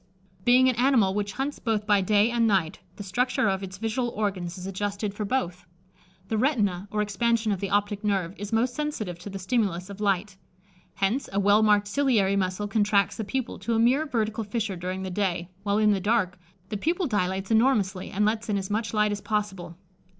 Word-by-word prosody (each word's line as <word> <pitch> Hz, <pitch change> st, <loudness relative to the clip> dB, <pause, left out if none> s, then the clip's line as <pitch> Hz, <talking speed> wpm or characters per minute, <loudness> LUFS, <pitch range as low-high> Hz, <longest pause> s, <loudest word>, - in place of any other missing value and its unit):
Being 255 Hz, +1 st, +6 dB
an 255 Hz, -, +2 dB
animal 240 Hz, -7 st, +3 dB
which 205 Hz, -1 st, -2 dB
hunts 275 Hz, +2 st, -3 dB
both 220 Hz, -3 st, -1 dB
by 205 Hz, -2 st, +4 dB
day 210 Hz, +4 st, +3 dB
and 235 Hz, -1 st, +2 dB
night, 190 Hz, -7 st, +1 dB, 0.2 s
the 205 Hz, -, -7 dB
structure 240 Hz, +3 st, 0 dB
of 190 Hz, 0 st, 0 dB
its 190 Hz, -1 st, -7 dB
visual 225 Hz, +4 st, -1 dB
organs 190 Hz, -5 st, -3 dB
is 180 Hz, -, -7 dB
adjusted 200 Hz, +1 st, -3 dB
for 210 Hz, +1 st, -4 dB
both. 180 Hz, -7 st, -2 dB, 0.6 s
The 220 Hz, +1 st, -1 dB
retina, 205 Hz, -8 st, +1 dB
or 210 Hz, 0 st, 0 dB
expansion 220 Hz, +2 st, 0 dB
of 195 Hz, -, -1 dB
the 195 Hz, -, -3 dB
optic 205 Hz, +1 st, 0 dB
nerve, 195 Hz, -4 st, 0 dB
is 205 Hz, 0 st, -6 dB
most 235 Hz, +2 st, +1 dB
sensitive 240 Hz, -, -4 dB
to 180 Hz, -, -8 dB
the 195 Hz, -, -6 dB
stimulus 190 Hz, -3 st, -1 dB
of 200 Hz, +1 st, -9 dB
light; 200 Hz, 0 st, 0 dB, 0.6 s
hence, 220 Hz, +8 st, 0 dB
a 195 Hz, -, 0 dB
well 205 Hz, +2 st, +4 dB
marked 210 Hz, -1 st, +4 dB
ciliary 215 Hz, -6 st, +2 dB
muscle 190 Hz, +1 st, -1 dB
contracts 205 Hz, -1 st, +2 dB
the 220 Hz, -, -2 dB
pupil 255 Hz, +4 st, -3 dB
to 225 Hz, +5 st, -1 dB
a -, -, +2 dB
mere 260 Hz, +7 st, +3 dB
vertical 220 Hz, -3 st, -1 dB
fissure 210 Hz, -1 st, -2 dB
during 185 Hz, +2 st, -4 dB
the 190 Hz, -, -4 dB
day, 180 Hz, -2 st, -1 dB
while 200 Hz, 0 st, 0 dB
in 215 Hz, -1 st, +4 dB
the 200 Hz, -, +1 dB
dark, 195 Hz, -3 st, +1 dB, 0.3 s
the 210 Hz, -, -2 dB
pupil 340 Hz, -, 0 dB
dilates 190 Hz, -, -1 dB
enormously, 220 Hz, -5 st, +2 dB
and 210 Hz, +2 st, 0 dB
lets 220 Hz, +1 st, -1 dB
in 205 Hz, -, +1 dB
as 195 Hz, 0 st, -4 dB
much 220 Hz, +1 st, -1 dB
light 210 Hz, 0 st, +3 dB
as 205 Hz, 0 st, -3 dB
possible. 195 Hz, -5 st, -3 dB
205 Hz, 205 wpm, -26 LUFS, 195-225 Hz, 0.6 s, Being